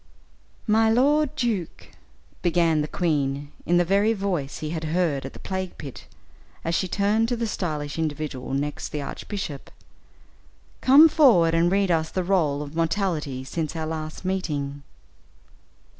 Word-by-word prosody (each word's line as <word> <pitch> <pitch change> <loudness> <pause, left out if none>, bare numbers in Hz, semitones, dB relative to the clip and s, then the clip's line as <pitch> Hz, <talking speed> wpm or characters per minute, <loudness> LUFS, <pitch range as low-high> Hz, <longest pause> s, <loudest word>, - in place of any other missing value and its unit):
"My 220 0 +4
lord 290 +5 +3
Duke," 225 - -2 0.5
began 165 -3 +2
the 150 - -2
queen, 145 -4 -1 0.2
in 175 - +4
the 175 - +3
very 200 +5 +3
voice 185 -9 -2
he 155 0 -4
had 160 -1 -3
heard 155 -5 0
at - - -11
the - - -11
plague 190 -1 -4
pit, 135 -4 -9 0.6
as 165 - 0
she 185 - +1
turned 205 +4 +1
to 245 - 0
the 230 0 -2
stylish 155 -8 -3
individual 145 -4 -3
next 145 +1 -3
the 150 -1 -4
archbishop, 160 -2 -6 1.1
"come 280 +5 +8
forward 235 - +5
and 170 +1 +3
read 195 -1 +2
us 160 -1 +1
the 185 - -2
roll 160 -6 +1
of 145 +2 -10
mortality 165 -6 -1
since 155 +4 -4
our 160 -1 -2
last 155 +2 -5
meeting." 145 -7 -2
165 Hz, 150 wpm, -24 LUFS, 150-200 Hz, 1.1 s, come